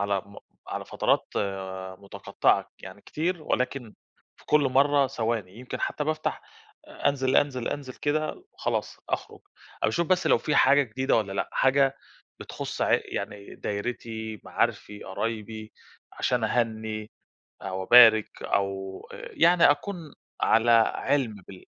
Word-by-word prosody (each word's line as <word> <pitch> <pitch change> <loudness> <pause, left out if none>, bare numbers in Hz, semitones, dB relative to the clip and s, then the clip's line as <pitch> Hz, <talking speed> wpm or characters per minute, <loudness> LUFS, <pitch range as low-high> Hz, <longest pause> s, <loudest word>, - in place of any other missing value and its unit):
على 100 -1 +1
م 100 - -15 0.3
على - - -4
فترات - - 0 0.7
متقطعة 100 0 0
يعني - - -10
كتير 170 +1 -3
ولكن 125 -5 -2 0.4
في - - -22
كل 150 - +4
مرّة 140 +1 +3
ثواني. 110 -6 -3
يمكن 125 - -6
حتى 150 - -2
بافتح 155 0 -2 0.5
أنزل، 140 - 0
أنزل، 130 -4 +1
أنزل 135 -3 -5
كده 155 - -2
وخلاص. - - -3
أخرج - - -4 0.4
أ - - +3
باشوف 170 -1 0
بس 185 0 +2
لو - - +5
في 150 - -1
حاجة 145 +1 +6
جديدة 130 +2 0
والّا 105 -3 -1
لأ، 100 - -2
حاجة 135 0 +3 0.4
بتخص - - -5
ع - - +2
يعني 100 0 -6
دايرتي، 110 0 -5
معارفي، 105 0 -2
قرايبي، 110 +1 -5 0.4
عشان 125 -3 0
أهني 110 -2 -2 0.5
أو 95 0 -4
أبارك 115 -1 +6
أو 95 -1 -2
يعني 170 -2 +4
أكون 185 +7 -3 0.5
على 115 +1 +4 0.2
علم 135 -6 0
بال 95 -2 -12
120 Hz, 130 wpm, -26 LUFS, 110-145 Hz, 0.7 s, حاجة